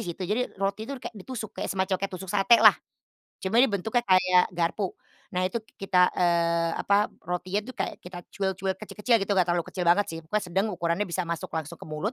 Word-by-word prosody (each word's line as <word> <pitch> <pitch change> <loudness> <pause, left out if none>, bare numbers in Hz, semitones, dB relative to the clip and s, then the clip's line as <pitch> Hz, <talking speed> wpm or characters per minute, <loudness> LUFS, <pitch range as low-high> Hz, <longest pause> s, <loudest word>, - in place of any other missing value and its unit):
situ. 175 +2 -5
Jadi 220 +5 -2
roti 195 +3 -2
itu 275 - -4
kayak 250 - -7
ditusuk 220 +1 -7
kayak - - -2
semacam 190 0 -1
kayak 195 - -1
tusuk 185 0 -7
satelah. 215 +2 +7 0.7
Cuma 190 +4 -1
dia 250 - +7
bentuknya 220 +5 0
kayak 185 -1 +5
garpu. 175 +3 -1 0.4
Nah, 180 - 0
itu 210 - -5
k 195 -3 -11
kita, 180 -1 +4
eee, 170 -1 +2
apa, 205 +1 +3 0.2
rotinya 185 +4 -2
itu 255 - -8
kayak - - -3
kita 180 0 -10
cuil-cuil 190 -1 -2
kecil-kecil 225 +3 0
gitu, 200 - -1
Kak, - - 0
nggak 175 - +1
terlalu 175 -1 +1
kecil 180 -1 -2
banget 190 +4 +5
sih, 165 - -6
pokoknya 200 +7 -2
sedang 190 +4 0
ukurannya 175 +1 -1
bisa 180 +1 -2
masuk 170 -1 -4
langsung 160 +1 -5
ke - - -10
mulut. 155 - -3
190 Hz, 215 wpm, -27 LUFS, 175-210 Hz, 0.7 s, satelah